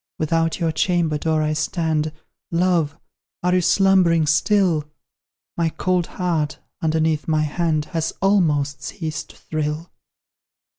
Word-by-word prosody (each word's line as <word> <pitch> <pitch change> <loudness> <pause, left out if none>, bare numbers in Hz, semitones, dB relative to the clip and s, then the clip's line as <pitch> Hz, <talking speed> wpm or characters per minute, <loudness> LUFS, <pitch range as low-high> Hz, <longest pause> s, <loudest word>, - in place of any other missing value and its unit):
Without 165 +1 0
your 165 -2 +1
chamber 160 -1 +1
door 160 -1 +1
I 155 0 0
stand; 155 0 -1 0.4
Love, 170 -3 +1 0.5
are 180 0 +2
you 185 - +3
slumbering 180 -3 +4
still? 165 +1 +2 0.7
My 165 -1 +1
cold 180 +1 0
heart, 165 -5 -1 0.2
underneath 160 -1 +1
my 155 -1 +2
hand, 155 0 0
Has 165 -1 0
almost 155 -8 +2
ceased 160 -2 -5
to - - -15
thrill. 155 +1 -4
160 Hz, 120 wpm, -22 LUFS, 155-175 Hz, 0.7 s, slumbering